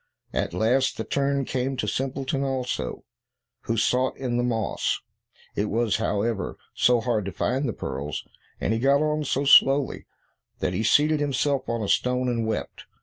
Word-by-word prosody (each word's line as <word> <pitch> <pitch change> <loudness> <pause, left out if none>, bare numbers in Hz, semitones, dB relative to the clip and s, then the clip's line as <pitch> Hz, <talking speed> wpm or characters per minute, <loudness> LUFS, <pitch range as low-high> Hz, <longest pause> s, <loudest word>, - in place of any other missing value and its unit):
At 85 - -1
last 125 +7 +2
the 110 - -2
turn 140 +1 0
came 130 +1 -2
to - - -1
Simpleton 135 +1 -2
also, 130 - -3 0.6
who 115 - -1
sought 125 +4 +1
in 125 -3 -2
the 120 - +1
moss. 115 -3 -1 0.6
It 105 - 0
was, 110 0 +1
however, 105 -2 -1 0.2
so 120 -1 +3
hard 115 -3 0
to 100 - -3
find 130 +7 -1
the - - -2
pearls, 70 -1 -5 0.3
and 110 - 0
he 115 - 0
got 140 +4 +3
on 150 0 0
so 140 +1 0
slowly, 135 0 +5 0.5
that 90 - -1
he 90 - -1
seated 150 +7 +3
himself 140 -1 0
on 115 -1 -1
a - - -2
stone, 125 +4 +1
and 115 -2 -1
wept. 110 - -4
125 Hz, 170 wpm, -25 LUFS, 110-135 Hz, 0.6 s, slowly